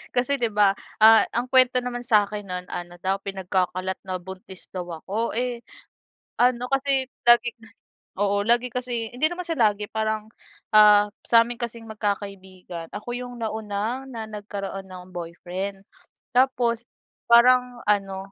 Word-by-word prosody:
Kasi 255 +3 +1
'di 240 - +2
ba? 205 -2 +5 0.3
Ah, 220 0 +8
ang 245 +2 -1
kuwento 255 -1 +5
naman 245 -1 -3
sa'kin 210 -3 +1
no'n, 180 -1 -4
ano 175 0 -6
daw, 190 +2 -1
pinagkakalat 190 -1 -2
na 185 - -2
buntis 190 0 -10
daw 180 -2 -5 0.2
ako. 220 +4 -2
Eh, 245 0 -1 0.8
ano 245 0 +3
kasi 270 -1 +1 0.2
laging 240 0 +5 0.6
oo, 200 0 +1
lagi 240 +1 +3
kasi 245 -3 -3
hindi 255 +6 +2
naman 355 +1 -4
siya 330 -2 -2
lagi 205 0 -7
parang, 220 0 -2 0.4
ah, 210 -1 +7 0.2
sa'min 235 +1 +4
kasing 235 -1 -5
magkakaibigan, 195 -5 -5
ako 210 +4 -6
'yong 245 0 -6
nauna 220 +2 -3
na 230 -4 -6
nagkaroon 200 -2 -6
ng 185 0 -11
boyfriend. 180 +3 -5 0.5
Tapos, 245 -2 +2 0.4
parang 245 +1 +5
ano, 195 -1 0
215 Hz, 140 wpm, -24 LUFS, 195-245 Hz, 0.8 s, Ah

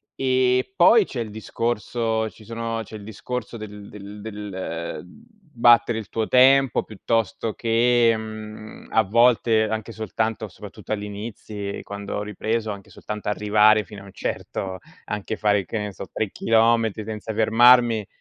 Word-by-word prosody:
E 130 +4 +1
poi 195 +4 +6
c'è 125 - -6
il 110 - -5
discorso 110 0 -2
ci 110 - -17
sono 115 0 -4
c'è 110 - -11
il 105 - -9
discorso 115 +3 -6
del 105 -1 -9
del 105 0 -10
del 95 -7 -6
battere 135 - +1
il 105 - -8
tuo 110 -1 -2
tempo 135 0 +5
piuttosto 115 0 -2
che, 115 0 +3
mhmm, 110 0 -9
a 110 - +4
volte, 115 +1 +3
anche 110 +1 -4
soltanto 110 0 -3
soprattutto - - -8
agli 105 -1 -3
inizi, 105 -1 -6
quando 100 0 -6
ho 105 - -2
ripreso, 110 +1 -2
anche 100 -1 -9
soltanto 105 -1 -7
arrivare 105 +1 +4
fino 100 -2 -11
a - - -14
un 100 - -14
certo, 95 -1 -4 0.3
anche 105 +1 -4
fare 105 -3 +2
che 110 - -3
ne 105 -1 -4
so, 95 - -8
3 110 -3 -2
chilometri 115 -1 +2
senza 110 0 -6
fermarmi 115 0 +5
110 Hz, 150 wpm, -23 LUFS, 105-115 Hz, 0.3 s, poi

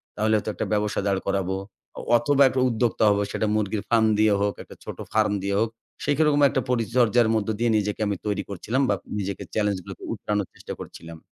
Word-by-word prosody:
তাহলে 110 +1 +1
হয়তো 105 - -3
একটা - - -3
ব্যবসা 105 0 0
দাঁড় 100 -1 +1
করাবো 95 -1 0 0.4
অ - - -5 0.2
অথবা 140 +4 +3
একটা 130 0 0
উদ্যোক্তা 115 -1 0
হবো, 100 0 +2
সেটা - - -1
মুরগির 105 -1 -1
ফার্ম 115 -2 +4
দিয়ে 110 -1 +4
হোক, 100 0 +1
একটা - - -14
ছোট - - -7 0.2
ফার্ম 110 -1 +3
দিয়ে 100 0 0
হোক। 115 +1 +1 0.4
সেরকম 145 0 +3
একটা - - 0
পরিচর্যার 120 -1 +3
মধ্য 110 -2 0
দিয়ে 120 0 +2
নিজেকে 105 0 -2
আমি 100 - 0
তৈরি 105 -1 -1
করছিলাম 110 +7 -1
বা 100 - +3 0.2
নিজেকে 100 -1 -4
চেলেঞ্জ 105 -2 +1
গুলোকে - - -10
উতরানোর 105 -2 -2
চেষ্টা - - -8
করছিলাম। 80 0 -10
105 Hz, 195 wpm, -25 LUFS, 100-115 Hz, 0.4 s, ফার্ম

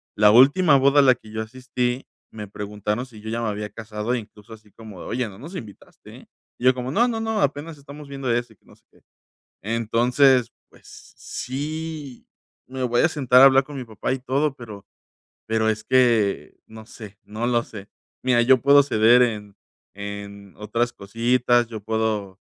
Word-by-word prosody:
La 105 0 +5
última 140 - +5
boda 140 +2 +4
a - - +6
la 130 -2 +5
que 110 - -16
yo 110 0 -4
asistí, 125 +2 -3 0.3
me 105 -1 -8
preguntaron, 105 +3 -4
si 115 -5 -15
yo 110 - -7
ya 115 +1 -3
me 115 - -2
había 105 0 -5
casado, 105 +2 -5
e 125 - 0
incluso, 105 -1 -15
así 110 -1 -16
como 110 -5 -12
de, - - -9
oye, 125 -2 -2
no 95 - -14
nos 160 +9 -10
invitaste, 110 - -12
¿eh?. - - -17 0.3
Y 125 - -5
yo, 130 - +6
como, 125 0 -5
no, 235 - +3
no, 225 -2 -3
no. 220 -1 -1
Apenas 145 +2 -2
estamos 145 +1 -12
viendo 135 -3 -3
eso, 120 -1 -2
y - - -32
que - - -39
no - - -19
sé - - -33
qué. - - -26 0.6
Entonces, 120 +3 +2 0.2
pues, - - -17
sí, 150 0 -6 0.4
me 130 0 -6
voy 120 -1 +1
a - - +4
sentar 130 -6 +3
a - - +10
hablar 135 0 +5
con 145 +1 -10
mi 130 - -5
papá, 110 +1 -4
y 135 - -2
todo, 135 +3 -1
pero 105 -5 -11 0.6
pero 110 0 +1
es 110 0 -2
que 120 -6 +1
no 110 0 -13
sé. 105 -3 -12
No 110 +3 -4
lo 120 -1 +1
sé. 105 -2 -11 0.3
Mira, 125 -2 +3
yo 130 +1 +4
puedo 140 +1 +6
ceder 120 -2 +4
en 105 -4 -2 0.4
en 100 -1 -9
otras 115 +3 -2
cositas. 120 +3 +1
Yo 110 -2 -7
puedo, 105 -3 -2
120 Hz, 195 wpm, -23 LUFS, 110-130 Hz, 0.6 s, a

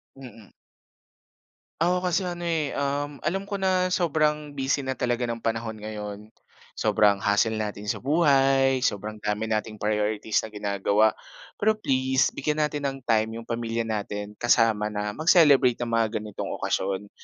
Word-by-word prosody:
Mm. 120 -6 -13 1.3
Ako 180 +2 +2
kasi 180 0 +1
ano 175 -1 -4
eh, 160 -4 0
um, 140 +1 -2
alam 195 +5 -2
ko 200 - -2
na 185 -1 +1
sobrang 150 -4 0
busy 135 0 -1
na 130 - -1
talaga 120 -1 -1
ng 115 -1 -4
panahon 115 -1 -2
ngayon 105 -1 -6 0.5
sobrang 100 -2 +2
hassle 105 +2 +2
natin 105 -1 -4
sa 105 - -2
buhay 135 -3 +3
sobrang 105 -2 -2
dami 105 +1 -1
nating 110 0 -2
priorities 105 0 0
na 110 - -7
ginagawa 105 +1 +1 0.4
pero 215 +1 +2
please 130 -8 +1
bigyan 150 +2 0
natin 150 -1 -4
ng 135 - -7
time 110 -1 +1
yung 115 - -8
pamilya 115 0 -2
natin 105 -1 -4
kasama 115 -3 +3
na 105 0 -3
mag-celebrate 150 -7 +5
ng 120 - -2
mga 115 -1 +1
ganitong 105 -2 -6
okasyon. 100 +1 -2
120 Hz, 150 wpm, -25 LUFS, 105-145 Hz, 1.3 s, mag-celebrate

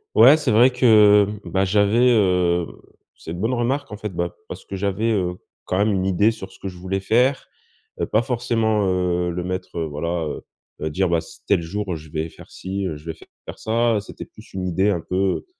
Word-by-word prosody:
Ouais, 145 +4 +8
c'est 145 -5 -1
vrai, 120 +4 +6
que, 105 -5 +6
heu, 105 0 -7
ben, 95 +2 0
j'avais, 105 +5 +3
heu, 90 -5 +2 0.5
c'est 80 - -9
une 85 - -6
bonne 115 +4 0
remarque 130 +2 -1
en 105 - -6
fait, 105 0 -5
bah, 85 0 -2
parce - - -8
que 95 - -7
j'avais, 100 +4 0
heu, 90 -4 0 0.3
quand 95 - -1
même 105 +2 +2
une 95 -1 0
idée 100 +4 +3
sur 95 -3 -9
ce - - -16
que 95 - -5
je 90 - -12
voulais 95 +2 -3
faire. 125 +7 +1 0.5
Heu, - - 0
pas 110 - +1
forcement, 115 -4 0
heu, 90 -1 0
le 85 +1 -3
mettre, 90 0 -5
heu, 85 - -1
voilà, 85 +3 -3
heu 75 - -5 0.4
heu, 80 - -1
dire: 90 +4 0
«Bah 85 -1 +2
c'est 80 - -15
tel - - +3
jour, 95 +2 -4
je 75 0 -13
vais 80 +1 -3
faire - - -15
çi, 95 +1 -5
heu, 80 - -3
je 75 - -16
vais - - -8 0.3
faire - - -9
ça», 115 -1 +1
c'était 100 - -10
plus - - -17
une 95 -1 -3
idée 95 +4 +1
un 90 -5 0
peu, 95 +3 -1
95 Hz, 225 wpm, -22 LUFS, 90-110 Hz, 0.5 s, Ouais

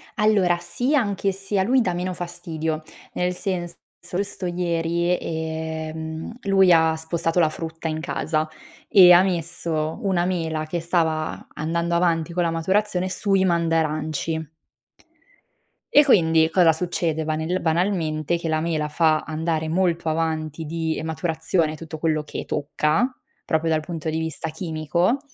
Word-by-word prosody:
Allora, 205 -5 +3
sì, 245 - 0
anche 200 -6 +1
se 195 +1 -2
a 190 - +3
lui 255 +5 +3
dà 185 -6 0
meno 180 +1 -2
fastidio. 160 -3 -4 0.3
Nel 180 0 0
senso, 175 -2 -3 0.2
solsto 185 +2 -4
ieri, 170 0 0
ehm, 160 +1 -4
lui 195 -2 +4
ha 160 -1 +5
spostato 165 +1 -1
la 160 -3 +4
frutta 165 +1 -6
in 155 0 -2
casa 155 0 -1 0.4
e 180 -3 +8
ha 175 0 +8
messo 165 -3 -1
una 185 -4 +1
mela 160 -4 -1
che 170 +3 -3
stava 160 -2 -1
andando 170 +2 -1
avanti 170 -1 +1
con 175 - +1
la 165 - +1
maturazione 190 +2 0
sui 195 0 +2
mandaranci. 160 -2 0 1.4
E 290 - +8
quindi 160 - +4
cosa 165 -1 +5
succede? 165 -1 -1
Banel 160 +4 -1
banalmente, 165 -2 0
che 165 -1 -4
la 155 0 +1
mela 155 -2 -1
fa 155 0 +2
andare 160 0 -2
molto 170 -1 +1
avanti 160 -1 -2
di 160 +1 -2
maturazione 160 0 -1
tutto 160 0 -8
quello 155 -1 0
che - - -6
tocca 150 - 0 0.4
proprio 160 0 0
dal 155 - +2
punto 160 0 -5
di 160 +1 -1
vista 160 0 -4
chimico, 170 - 0
165 Hz, 140 wpm, -23 LUFS, 160-180 Hz, 1.4 s, e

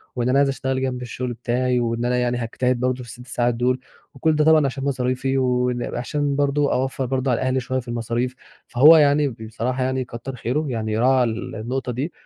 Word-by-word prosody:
وان 120 0 0
أنا 135 - +3
عايز 140 -1 +3
أشتغل 130 -1 -2
جنب 125 -1 -2
الشغل 125 0 -4
بتاعي، 125 +1 0
واننا 120 +1 0
يعني 125 0 0
هاجتهد 125 +1 -1
برضه 125 0 +1
في 120 - -12
ال6 125 0 -11
ساعات 120 -1 0
دول، 125 +2 +1 0.3
وكل 155 +4 +1
ده 150 - +3
طبعًا 160 -2 +5
عشان 135 0 -3
مصاريفي 130 0 -1
وإن 125 -1 0
وعشان 145 +3 -1
برضه 145 0 +1
أوفر 130 +1 -1
برضه 130 0 0
على 120 - 0
أهلي 130 0 +1
شوية 130 +1 -2
في 125 - -10
المصاريف، 120 +2 -2 0.3
فهو 150 +7 +7
يعني 145 -1 +4
بصراحة 115 +3 -3
يعني 130 0 -1
كتر 120 +3 -7
خيره 130 +7 -2
يعني 110 -2 -2
راعَى 130 +2 +4
النقطة 120 +3 -3
دي، 135 +8 -3
125 Hz, 195 wpm, -22 LUFS, 120-135 Hz, 0.3 s, فهو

